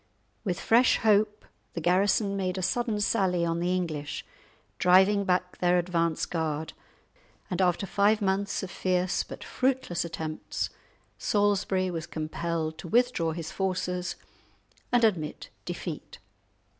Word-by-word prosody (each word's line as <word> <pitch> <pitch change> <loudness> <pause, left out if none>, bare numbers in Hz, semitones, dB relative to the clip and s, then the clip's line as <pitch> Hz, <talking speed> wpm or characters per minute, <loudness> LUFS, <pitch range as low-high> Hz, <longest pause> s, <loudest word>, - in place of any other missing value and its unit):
With 180 -5 -2
fresh 235 +2 +4
hope, 210 -1 +2 0.3
the - - -3
garrison 195 +4 +2
made 185 -1 -1
a 185 - -2
sudden 220 +3 0
sally 185 -5 +2
on 165 0 0
the 180 +1 +1
English, 155 -5 -3 0.5
driving 190 +3 +5
back 180 -1 0
their 180 0 +3
advance 170 -2 0
guard, 160 -2 -2 0.8
and 180 - 0
after 180 +1 +2
five 205 +3 +3
months 200 0 0
of 185 - -5
fierce 185 0 0
but - - -8
fruitless 255 -10 0
attempts, 160 -2 -4 0.5
Salisbury 200 -2 +1
was 165 -2 -4
compelled 160 0 -3
to 175 - -7
withdraw 235 -6 +2
his 160 -1 -5
forces 185 -1 -2 0.8
and 245 -1 +3
admit 175 -9 0 0.2
defeat. 175 -2 -6
180 Hz, 130 wpm, -28 LUFS, 170-200 Hz, 0.8 s, driving